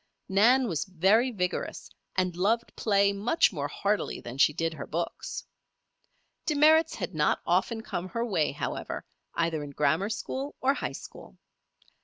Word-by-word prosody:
Nan 240 +7 +4
was 165 -7 -1
very 195 +7 +3
vigorous, 180 -6 -3 0.2
and 185 -2 0
loved 220 +6 0
play 200 -2 +3
much 210 +5 +2
more 145 -3 -2
heartily 200 +7 -1
than 120 +3 -8
she 150 - +6
did 165 +2 -2
her 155 - -7
books. 170 +3 -4 1.0
Demerits 315 +2 +5
had - - -4
not - - +2
often 230 -2 +1
come 185 -4 -4
her 230 +6 -2
way, 165 -10 +1
however, 145 - -4 0.3
either 165 -2 0
in 145 - -7
grammar 150 +7 +1
school 265 +5 -4
or 270 +1 +3
high - - -3
school. - - -11
195 Hz, 150 wpm, -28 LUFS, 165-235 Hz, 1.0 s, she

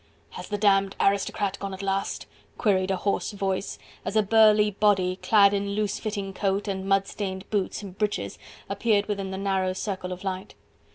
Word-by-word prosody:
"Has 180 - -8
the 205 - -1
damned 195 -1 +3
aristocrat 200 0 +1
gone 195 -1 -4
at 190 - -8
last?" 195 0 -2 0.3
queried 190 -4 +2
a 190 - +2
hoarse 200 +3 -1
voice, 195 -1 -2 0.3
as 200 - -4
a 215 - +4
burly 210 0 +5
body 190 -3 +2
clad 200 0 +5
in 200 0 -1
loose 210 -1 -1
fitting 200 -3 -4
coat 195 +1 -1
and 195 -1 -3
mud 195 0 +3
stained 190 -2 -5
boots 205 0 -1
and 190 -2 -9
breeches 210 0 -2 0.3
appeared 210 -3 +1
within 200 -2 -3
the 190 - -4
narrow 190 -1 0
circle 185 -1 -4
of 180 +1 -6
light. 190 +1 -4
195 Hz, 180 wpm, -26 LUFS, 190-205 Hz, 0.3 s, burly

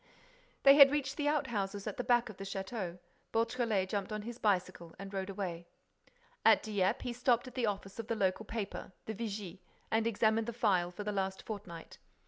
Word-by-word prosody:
They 275 0 +9
had 280 -2 +11
reached 275 -2 -1
the 290 -1 0
out 295 -1 +2
houses 200 -4 -3
at 210 - -4
the 245 - -1
back 240 0 +3
of 210 - -10
the 195 - -6
château. 195 -2 -4 0.3
Beautrelet 230 -4 +1
jumped 200 0 -2
on 215 -1 -3
his 240 +2 -7
bicycle 180 -4 0
and 195 +1 -8
rode 190 0 -3
away. 180 -4 -4 0.8
At - - +6
Dieppe, 200 -3 0
he 245 - -3
stopped 245 +1 +2
at 255 - -9
the 240 -3 0
office 195 0 -4
of 225 - -4
the 230 - 0
local 195 +1 0
paper, 205 -3 -5
the 220 - -3
Vigie, 205 -4 -5 0.3
and 225 +1 +2
examined 220 0 +2
the 235 - -3
file 185 -6 +2
for 180 +4 -7
the 210 - -2
last 190 -1 -2
fortnight. 185 -6 -8
210 Hz, 200 wpm, -33 LUFS, 195-235 Hz, 0.8 s, had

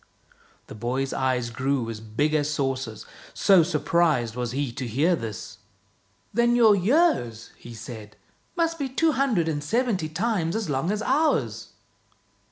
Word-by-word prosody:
The - - -11
boy's 125 +5 -2
eyes 125 -3 0
grew 130 0 -1
as 110 - -7
big 115 +8 -1
as 150 -1 +1
saucers, 130 -6 -3 0.3
so 195 -3 +5
surprised 155 -6 +1
was 125 -1 -3
he 135 -1 -2
to 125 +1 -5
hear 150 +10 +2
this. 110 - -7 0.4
" - - -40
Then 240 +1 +3
your 225 -4 +6
years," 195 - +1
he 120 -1 -11
said 110 -1 -9 0.2
" - - -40
must 330 -1 0
be 275 -2 -2
two 320 +5 +2
hundred 255 - +1
and 150 -2 -2
seventy 210 - 0
times 175 -1 -1
as 220 -9 -2
long 135 +5 -1
as 210 +1 -2
ours! 300 +6 0
150 Hz, 160 wpm, -25 LUFS, -, 0.4 s, your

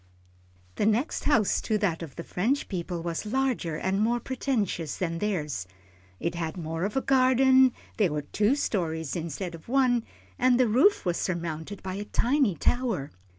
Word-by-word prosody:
The 210 - +2
next 230 +7 0
house 225 -9 +3
to 215 - 0
that 190 -6 0
of 160 -5 -8
the 170 - -6
French 240 +14 -1
people 175 -3 -4
was 170 -1 -3
larger 235 -8 -1
and 190 +5 0
more 235 +2 +2
pretentious 230 - -2
than 165 -2 -2
theirs. 150 - -2 0.5
It 170 - -2
had 165 0 -4
more 165 +1 -3
of 210 +5 -2
a - - +2
garden, 260 0 +5 0.3
there 200 -7 +3
were 150 -1 -2
two 210 - +1
stories 160 - -2
instead 170 +2 -4
of 165 +5 -12
one, 250 -3 +3 0.4
and 250 0 +4
the 255 - +4
roof 265 - +4
was 175 -1 0
surmounted 170 +1 -4
by 185 0 -4
a 205 - -4
tiny 245 - +2
tower. 225 - 0
200 Hz, 170 wpm, -27 LUFS, 165-250 Hz, 0.5 s, garden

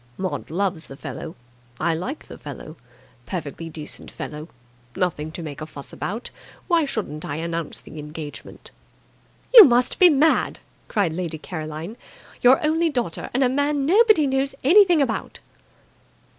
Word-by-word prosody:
Maud 185 -1 -4
loves 180 -1 -2
the 135 - -10
fellow. 165 +3 -7 0.4
I 165 +1 +1
like 215 - -5
the - - -11
fellow. - - -9 0.5
Perfectly 165 -2 -5
decent 155 -1 -8
fellow. 150 +2 -7 0.5
Nothing 160 -4 -1
to 170 - -6
make 150 -2 -7
a 155 - -5
fuss 140 -3 -9
about. 220 +6 -5 0.4
Why 335 -4 +3
shouldn't 195 - -4
I 145 - -4
announce 165 0 -4
the 155 - -11
engagement?" 150 0 -9 0.8
"You 465 -3 +13
must 245 -4 +3
be 360 - +9
mad!" 310 +1 +2 0.3
cried 195 -7 0
Lady 170 -2 -4
Caroline. 155 +5 -6 0.4
"Your 250 +2 +6
only 325 +2 +2
daughter 245 - -3
and 265 +2 +2
a - - +4
man 285 +2 0
nobody 415 -1 +5
knows 270 0 0
anything 350 0 +6
about!" 230 -5 -4
190 Hz, 145 wpm, -23 LUFS, -, 0.8 s, You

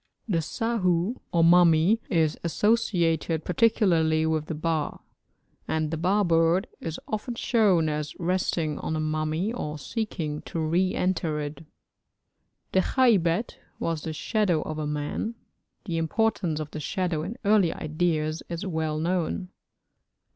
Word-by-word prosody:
The 170 -6 +1
sahu 190 - 0
or 170 -1 +3
mummy 175 +4 +5
is 160 -3 +2
associated 170 -5 +1
particularly 170 -6 +3
with 155 -1 0
the 160 - -3
ba; 155 -1 -1 0.7
and 155 -1 -1
the 165 - -2
ba 190 +6 +2
bird 170 +2 +3
is 165 -1 -5
often 220 +3 -3
shown 200 -10 +3
as 150 -1 -3
resting 170 -3 0
on - - -3
the 155 - -1
mummy 155 +6 -1
or 150 -10 -4
seeking 155 - -3
to 165 - -4
re 175 +4 +1
enter 170 -4 0
it. 150 +2 -5 1.1
The 190 - +3
khaybet 205 -4 +2 0.2
was 165 -2 -2
the 160 - -4
shadow 180 -1 0
of 155 0 -5
a 150 - -2
man; 150 +10 -3 0.5
the 170 -5 -2
importance 170 -1 0
of 155 -1 -5
the 155 - -5
shadow 175 0 -1
in 195 +10 -5
early 200 -5 +4
ideas 155 0 -1
is 170 +3 -4
well 160 -4 -1
known. 180 +2 -1
165 Hz, 140 wpm, -26 LUFS, 155-190 Hz, 1.1 s, mummy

